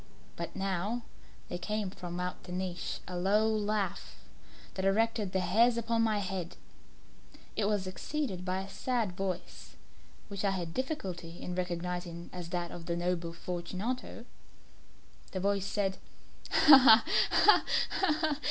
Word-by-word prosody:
But - - -6
now 195 +5 -1 0.4
there 175 - -4
came 210 +1 -2
from 175 -2 -6
out 180 0 -4
the 180 - -9
niche 180 -1 -3
a 180 - -5
low 200 +5 +3
laugh 210 -3 -1 0.6
that 190 - -3
erected 215 0 +2
the 190 - +1
hairs 225 +7 +4
upon 230 0 +1
my 220 -2 +2
head. 185 -3 -3 1.0
It 210 - +1
was 205 -2 +1
succeeded 190 +1 -3
by 185 +1 -1
a 195 - -7
sad 230 0 -1
voice, 185 -1 -5 0.5
which 200 -1 -5
I 200 - +3
had 175 -4 -3
difficulty 185 - -4
in 180 - -5
recognizing 175 -1 -4
as 175 -2 -6
that 175 -1 -3
of 170 -1 -8
the 170 - 0
noble 175 -1 -1
Fortunato. 185 +9 -4 1.1
The 190 - -2
voice 200 0 0
said 195 -2 -1 0.5
"Ha! 270 -7 +8 0.3
ha! 420 - +6 0.3
ha! 310 -4 +1
190 Hz, 140 wpm, -31 LUFS, 180-220 Hz, 1.1 s, Ha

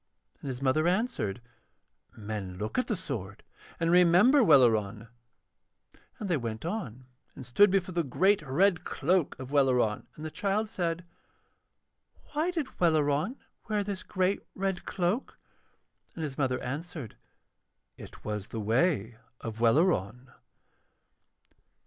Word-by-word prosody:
And - - -7
his 130 0 -4
mother 155 +5 +2
answered: 175 - -1 0.7
'Men 100 -4 -5
look 105 - -2
at 255 - -1
the 220 - 0
sword 110 - -6 0.4
and 165 0 +1
remember 180 +10 +6
Welleran.' 115 - +4 1.1
And 210 - -5
they 175 -4 +1
went 115 0 -5
on 150 - -5 0.3
and 130 - -9
stood 205 +13 +5
before 190 -1 0
the 170 - +1
great 190 +9 +2
red 160 +6 +2
cloak 175 +2 0
of 130 +1 -8
Welleran, 130 -6 +2
and 155 - -8
the 155 - -5
child 205 +4 -1
said: 175 -5 -2 1.3
'Why 310 +4 +1
did 320 -7 -4
Welleran 155 - +2 0.3
wear 210 -1 +1
this 200 -1 -4
great 185 -1 0
red 195 -1 -2
cloak?' 185 +7 -2 0.8
And 165 - -4
his 145 -3 -4
mother 130 -2 0
answered: 145 - -6 0.8
'It - - -13
was 105 -1 -4
the 115 -2 -5
way 115 - +1 0.2
of 115 0 -6
Welleran.' 125 - +2
155 Hz, 130 wpm, -29 LUFS, 120-190 Hz, 1.3 s, remember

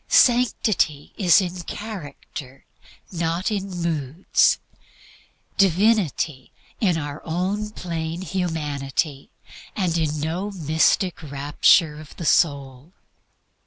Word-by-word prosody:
Sanctity 215 - +3
is 185 -2 +5
in 180 -1 -4
character 150 - -8 0.5
and 175 - -6
not 170 +5 0
in 200 -2 -2
moods; 165 -3 +1 1.0
Divinity 185 - +2 0.3
in 180 -6 +2
our 145 -1 -5
own 190 +6 -2
plain 165 -4 -4
calm - - -6
humanity, 150 -5 -2 0.5
and 180 -5 0
in 155 -1 -1
no 170 +7 -2
mystic 165 0 +1
rapture 150 +2 +3
of 155 - -14
the 170 - -6
soul. 140 0 +1
165 Hz, 100 wpm, -23 LUFS, 150-190 Hz, 1.0 s, is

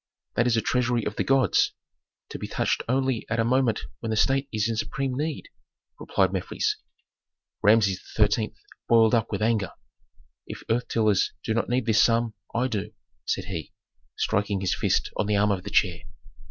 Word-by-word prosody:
"That 120 - +2
is 120 -1 +2
a - - +2
treasury 120 0 0
of 105 - -3
the - - 0
gods, 135 -7 +3 0.6
to - - -7
be - - -5
touched - - 0
only 130 -2 +1
at 115 +1 -1
a - - +4
moment 125 -1 +2 0.2
when 115 - -4
the 110 - 0
state 135 +5 +2
is 110 -1 0
in 115 - -1
supreme 135 +4 -2
need," 150 +2 -3 0.5
replied - - +1
Mefres. - - -1 0.8
Rameses 105 -3 +4
XIII. 105 +1 +1 0.3
boiled 115 -1 +5
up 115 -1 +1
with - - -1
anger. 110 -4 +1 0.7
"If - - -8
earth 120 +2 0
tillers 110 -4 +2
do 110 - -1
not 115 - -1
need 125 -1 +1
this 110 -2 +4
sum, 115 -1 +2 0.2
I 125 +3 0
do," 105 -3 -4 0.3
said - - -1
he, 85 -5 -6 0.4
striking 100 -1 0
his 95 - +1
fist - - 0
on 105 - 0
the 105 - +2
arm 105 +1 +3
of 95 -2 -1
the 100 - -6
chair. 90 -5 +2
115 Hz, 180 wpm, -26 LUFS, 105-120 Hz, 0.8 s, boiled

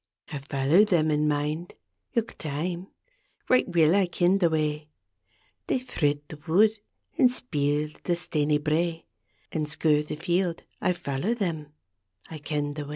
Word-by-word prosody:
I 145 - -3
follow 140 +7 +3
them 170 -7 +2
in 150 0 +2
mind 150 +3 -2 0.4
Ilk 230 -1 -1
time; 170 +5 -3 0.6
right 255 - +4
weel 165 -1 +4
I 195 -2 +3
ken 175 +2 +2
the 175 -3 +4
way, 150 -1 -1 0.4
— - - -40
■ - - -51
They - - +2
thrid 145 - -1
the 155 - -9
wood, 205 +7 +5 0.5
an' 255 -4 +7
speel 150 - -1
the 175 - 0
staney 155 -4 +1
brae 165 +2 -1 0.5
An' 155 -1 -1
skir 150 0 +2
the 150 - -5
field; 175 +1 -1 0.2
I 180 - +2
follow 175 - -2
them, 165 -9 -2 0.6
I 160 - -6
ken 145 -1 -2
the 145 -1 -5
way. - - -10
160 Hz, 160 wpm, -27 LUFS, 150-180 Hz, 0.6 s, an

